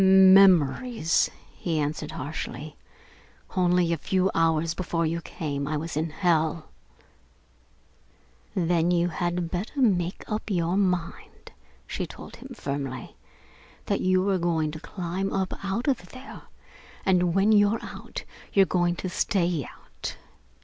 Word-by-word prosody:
"Memories!" 190 - +5 0.2
he 165 -3 -2
answered 150 +1 -2
harshly. 155 -1 -5 0.8
"Only 180 -2 +3
a - - -1
few 190 +3 +1
hours 165 0 +2
before 170 -2 -1
you 165 +1 -1
came, 140 -3 -4
I 155 +1 -1
was 165 +2 -5
in 160 +2 0
hell!" 160 -1 0 1.9
"Then 170 -1 +2
you 175 0 +2
had 175 0 -2
better 200 +10 -3
make 185 -8 +1
up 215 +1 -4
your 175 -2 +1
mind," 180 -4 -2 0.3
she - - -4
told - - -11
him - - -10
firmly, 140 -3 -5 0.7
"that - - 0
you 185 +1 +2
are 190 - +1
going 165 -3 0
to 155 - -7
climb 185 +3 -3
up 190 -1 -1
out 200 +6 -2
of 240 -10 0
there, 260 +1 -10 0.6
and 180 -2 +3
when 195 +3 +4
you're 205 +1 +4
out, - - -8 0.3
you're 195 -1 +6
going 175 -1 +1
to 185 - -4
stay 175 -3 0
out. - - -9
175 Hz, 135 wpm, -26 LUFS, 165-190 Hz, 1.9 s, you're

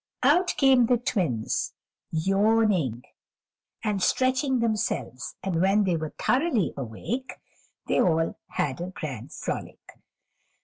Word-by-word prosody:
Out 360 0 +4
came 265 -4 +5
the 245 - +4
Twins, 175 - -1 0.3
yawning 195 - +2 0.8
and 210 -3 0
stretching 260 +6 +2
themselves, 215 - -2
and 180 -3 0
when 195 +3 +4
they 185 -3 +1
were 155 -1 -4
thoroughly 255 - +1
awake, 140 - -4 0.5
they - - +2
all 165 -2 +1
had 145 +3 -2
a 175 - -3
grand 140 - -6
frolic. - - -6
195 Hz, 115 wpm, -26 LUFS, 160-245 Hz, 0.8 s, came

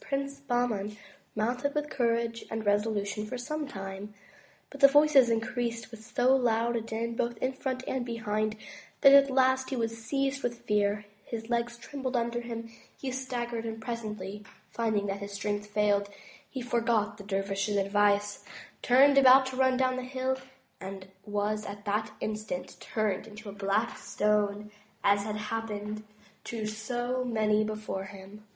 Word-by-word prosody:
Prince 275 0 -2
Bah 245 -3 +1
man 210 -2 -3 0.4
mounted 245 +6 0
with 300 0 -1
courage 230 -2 0
and 220 -1 -3
resolution 205 0 +1
for 250 - -4
some 300 +4 -3
time, 195 -2 -7 0.6
but 280 - -9
the 275 - +10
voices 290 -3 +6
increased 230 0 -1
with 225 -1 -10
so 250 +3 +3
loud 235 -2 +2
a 230 - 0
din, 225 +1 -3
both 240 0 -1
in 260 +1 -1
front 260 -1 -3
and 260 -2 -1
behind, 215 -2 -1 0.5
that 275 -1 +9
at 280 0 +8
last 260 0 +3
he 270 - -2
was 230 -2 -1
seized 275 +2 0
with 240 -1 -3
fear, 210 0 +1 0.2
his 225 0 -6
legs 235 0 0
trembled 265 +1 -4
under 235 0 0
him, 230 -1 -5 0.3
he 265 - -4
staggered, 245 -3 -3
and 225 -1 -4
presently 215 -3 -5 0.3
finding 220 -3 0
that 200 0 -2
his 200 0 -6
strength 205 +1 -2
failed, 205 -1 +2 0.4
he 260 - -5
forgot 230 -3 +1
the - - -8
dervish's 195 +1 -1
advice, 205 +1 +2 0.4
turned 275 +3 +6
about 265 0 +8
to 260 0 -4
run 260 -1 +3
down 255 0 +2
the - - -2
hill, 260 +1 -1 0.4
and 190 0 -7 0.2
was 210 +1 -1
at 205 0 -8
that 210 +1 0
instant 215 -4 -4
turned 215 -1 -1
into 215 0 -9
a - - -7
black 200 +3 0
stone 210 0 0 0.3
as 200 0 +4
had 210 -1 -2
hap 225 +2 -3
pened 210 +1 -4 0.4
to 225 -2 -4
so 240 +4 -2
many 215 -3 +2
before 215 -3 -4
him. 195 +2 -11
225 Hz, 165 wpm, -30 LUFS, 210-250 Hz, 0.6 s, the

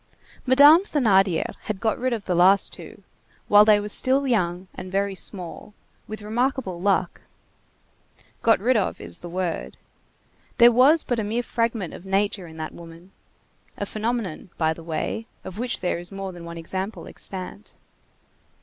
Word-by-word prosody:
Madame 290 +6 +7
Thénardier 200 - +1
had 215 -3 -4
got 220 0 -1
rid 255 +1 -1
of 225 -4 -3
the 180 - -1
last 185 +3 +4
two, - - -11 0.4
while 205 0 +7
they 210 -1 +5
were 205 - -5
still 265 +6 +3
young 185 -7 -1
and 185 - -9
very 200 +1 0
small, 190 +2 -2 0.3
with 215 -1 -7
remarkable 225 -4 -2
luck. 190 -2 0 1.2
Got 225 - +4
rid 250 +6 +2
of 205 -4 -1
is 85 - -3
the 175 - -9
word. 180 -1 -4 0.8
There 240 -1 +8
was 270 +7 +5
but 245 -2 -2
a - - -1
mere 225 +4 -2
fragment 230 -6 -2
of - - -10
nature 195 -1 -1
in 160 0 -13
that 155 0 -6
woman. 170 +2 -13 0.7
A 205 - -3
phenomenon, 215 -5 -4
by 160 -1 +1
the 165 - -12
way, 165 +7 -4 0.2
of 190 +2 -8
which 245 0 -2
there 180 -2 -1
is 175 +2 -7
more 195 -1 -6
than 175 -2 -11
one 170 0 -8
example 190 +5 -5
extant. 190 +2 -5
200 Hz, 165 wpm, -24 LUFS, 180-230 Hz, 1.2 s, There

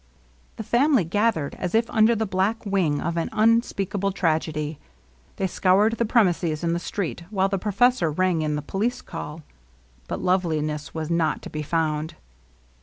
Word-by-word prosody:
The 220 - -6
family 255 +1 +3
gathered 180 -3 0
as 180 +2 -2
if 230 +1 +3
under 220 +1 +4
the 220 0 -1
black 200 +4 -1
wing 180 -8 +1
of 170 +1 -2
an 165 - -1
unspeakable 210 -3 +1
tragedy. 155 -4 -1 0.6
They 195 - -1
scoured 195 +4 +2
the 235 - +2
pre 230 +1 +4
mises 170 -4 -1
and 170 0 +1
the 170 - -1
street, 175 -1 -4
while 195 -2 +1
the 195 -1 -1
professor 215 -2 +2
rang 175 +1 +1
in 150 -1 -1
the 150 - -3
police 230 +10 -2
call. 160 -2 -7 0.6
But - - -4
Loveliness 155 -5 -1
was 160 0 -3
not 165 -2 0
to - - -8
be 155 - -4
found. 155 0 -1
185 Hz, 170 wpm, -24 LUFS, 160-210 Hz, 0.6 s, under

